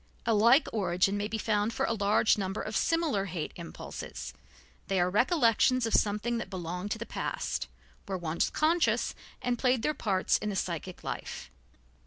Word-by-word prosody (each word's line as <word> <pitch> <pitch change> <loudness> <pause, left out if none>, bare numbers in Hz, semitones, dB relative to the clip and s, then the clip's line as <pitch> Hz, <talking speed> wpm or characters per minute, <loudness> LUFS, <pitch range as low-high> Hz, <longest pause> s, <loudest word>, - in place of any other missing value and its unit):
A 230 - +3
like 235 +8 +5
origin 190 -1 +1
may 205 0 -1
be 220 +1 -3
found 215 0 0
for - - 0
a - - 0
large 210 +1 +3
number 195 0 -3
of 215 - -4
similar 325 -12 +1
hate 170 -4 -4
impulses; 170 -1 -7 0.5
they 195 - +1
are 180 +1 +2
recollections 250 - +3
of 225 - -2
something 215 +3 +1
that 230 - -6
belonged 180 +1 -4
to 215 - -1
the 230 - -5
past, - - -3 0.4
were 195 -1 -2
once 170 -1 0
conscious 330 +2 +2 0.3
and 245 -1 0
played 250 -3 +2
their 300 - +1
parts 195 -9 +1
in 210 - -3
the 200 - -3
psychic 175 0 -4
life. - - -6
210 Hz, 175 wpm, -30 LUFS, 190-235 Hz, 0.5 s, like